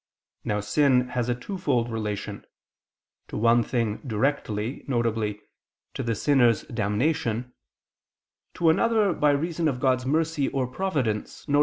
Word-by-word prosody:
Now 105 0 -1
sin 125 +3 +2
has 125 -1 -1
a 120 - +1
twofold 125 - -1
relation 105 -3 -4 0.8
to - - -6
one 115 +2 +4
thing 115 -2 -1
directly, 115 -2 -2
viz. 115 -5 0 0.6
to - - -4
the 115 -1 -1
sinner's 120 -3 +3
damnation 120 +2 -1 1.0
to 165 -2 +4
another, 215 +1 +2
by 150 - +2
reason 160 +3 0
of 130 -4 -1
God's 130 -1 +1
mercy 155 -1 +1
or 135 -2 -1
providence, 125 - -2
viz. 145 -1 +2
125 Hz, 130 wpm, -26 LUFS, 115-145 Hz, 1.0 s, one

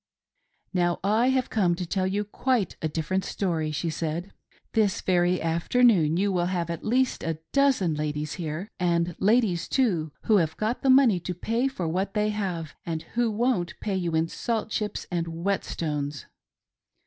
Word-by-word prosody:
" - - -48 0.3
Now 175 -1 +1
/ - - -46 0.3
have 260 -1 0
come 180 -6 +2
to 180 +1 -4
tell 185 +2 0
you 200 +2 0
quite 220 -1 0
a 160 - 0
different 165 +5 -1
story," 165 -5 -1
she 160 +2 -2
said, 165 +4 -3 0.4
"This 215 -4 +2
very 180 0 +2
afternoon 170 0 +3
you 200 +2 +2
will 175 -2 +1
have 175 -2 -1
at 170 - -5
least 255 +3 +1
a 165 -2 -2 0.2
dozen 270 - +3
ladies 150 0 -2
here; 165 +5 -4
and 170 -1 +1
ladies, 205 -4 +2
too, 180 - +1
who 215 - +4
have 160 -4 0
got 220 +3 -1
the 270 - +1
money 260 -8 +6
to 180 +1 -5
pay 230 +8 0
for 190 -11 -3
what 190 +5 -2
they 210 0 +2
have, 185 -7 -3
and 160 -2 -3
who 240 -1 +2
won't 215 -5 0
pay 200 -2 -2
you 175 -3 -1
in 160 +1 +2
salt 220 +4 -2
chips 210 -1 -2
and 170 -1 -1
whet 170 +4 -1
stones." 150 -3 -3
180 Hz, 180 wpm, -26 LUFS, 165-215 Hz, 0.4 s, money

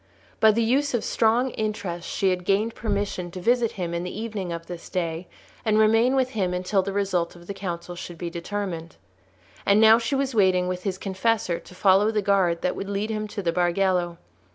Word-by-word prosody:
By 220 - +6
the 225 +2 +3
use 265 +4 +1
of 235 - -1
strong 235 +3 +2
interest 205 -6 -4
she 190 -1 +1
had 180 -1 -2
gained 205 +5 +1
permission 200 -4 -2
to 185 - -8
visit 235 +3 +2
him 175 -3 -4
in 170 - -1
the 180 +3 -5
evening 210 -5 -4
of 165 0 -5
this 175 -1 -8
day, 170 -1 -3 0.4
and 215 -2 +2
remain 225 +4 +4
with 260 -1 +1
him 185 -6 -1
until 185 +2 +1
the 195 - -4
result 190 -4 -1
of 175 0 -14
the 200 - -5
council 175 -2 -5
should 175 -1 -8
be 170 -1 -5
determined. 170 -2 -5 0.7
And 200 +1 +4
now 220 +1 +7
she 235 +4 -1
was 270 -1 -1
waiting 185 -4 +3
with 180 +1 -4
his 190 -2 -1
confessor 195 -1 0
to 180 - -15
follow 195 +2 +4
the 215 -2 0
guard 190 -4 +2
that 180 - 0
would 195 - -5
lead 205 +2 -2
him 215 -1 -3
to 205 -1 -5
the 170 - +1
Bargello. 175 0 +1
195 Hz, 210 wpm, -25 LUFS, 180-220 Hz, 0.7 s, now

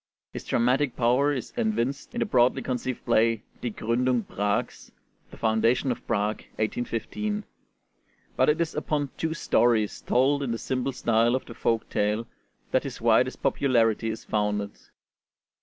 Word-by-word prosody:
His - - -7
dramatic 125 +2 +1
power 125 +4 +3
is 130 -4 -4
evinced 210 - -1
in - - -1
the - - +2
broadly 125 0 +3
conceived 125 0 -3
play 115 0 +2 0.2
'Die 120 - -2
Gründung 120 +2 0
Prags' 100 +1 -2 0.4
(The - - -13
Founding 115 +4 +2
of 120 - -6
Prague: 105 -1 0 0.2
1815); 120 - -2 0.9
but - - +3
it 150 +2 +2
is 170 -2 0
upon 150 -2 -2
two 160 0 -2
stories, 115 -8 +2
told 135 +3 +2
in 135 -4 -2
the 115 - -1
simple 130 +3 -2
style 115 -1 +2
of 130 - -3
the 115 - -9
folk 115 0 0
tale, 105 +2 0 0.5
that - - +3
his - - -7
widest - - +2
popularity 115 -4 +2
is 110 - -6
founded. 105 -1 -1
120 Hz, 150 wpm, -26 LUFS, 110-135 Hz, 0.9 s, power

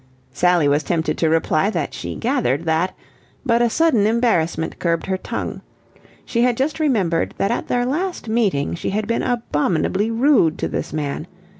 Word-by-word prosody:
Sally 175 0 +3
was 145 +1 +3
tempted 160 +1 -1
to 160 - +2
reply 160 +3 +2
that - - -2
she - - -5
gathered 230 - 0
that, 165 +3 0 0.5
but 235 -2 +3
a 240 - +3
sudden 245 -7 +3
embarrassment 195 -9 0
curbed 170 -1 0
her 190 - -1
tongue. 185 - -5 0.6
She 235 - 0
had 245 -1 +2
just 290 +4 -1
remembered 200 - +1
that 200 - 0
at 235 - -2
their 245 0 +1
last 335 +2 -2
meeting 210 -11 +1
she 170 - -3
had 210 +2 -1
been 230 +2 0
abominably 200 -3 0
rude 230 - +3
to - - -2
this - - -4
man. 145 -2 -3
205 Hz, 170 wpm, -20 LUFS, 165-240 Hz, 0.6 s, Sally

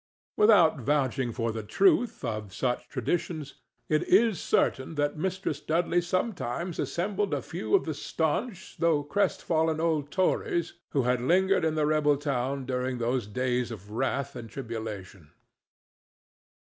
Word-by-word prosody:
Without 195 -8 +5
vouching 130 -1 0
for 115 0 -2
the 110 0 -4
truth 245 - +2
of 105 -3 -4
such 125 -1 -1
traditions, 150 +2 -3 0.3
it 155 0 +2
is 210 0 +4
certain 135 +5 +1
that 145 0 0
Mistress 185 -2 -2
Dudley 170 +3 +1
sometimes 175 - -2
assembled 190 -1 -1
a 140 - -2
few 110 - -1
of - - +2
the 155 - -2
stanch 170 - -3
though 165 -3 +2
crestfallen 160 -2 0
old 160 -3 0
Tories 175 -2 0 0.2
who 135 - +1
had 125 0 +1
lingered 190 +8 +3
in 160 -1 +1
the 155 -1 +2
rebel 150 -1 +3
town 135 -1 -2
during 125 0 -2
those 120 -1 -1
days 125 +2 -1
of 105 -3 -9
wrath 135 +3 -2
and 115 -1 -7
tribulation. 105 - -7
145 Hz, 140 wpm, -28 LUFS, 125-170 Hz, 0.3 s, Without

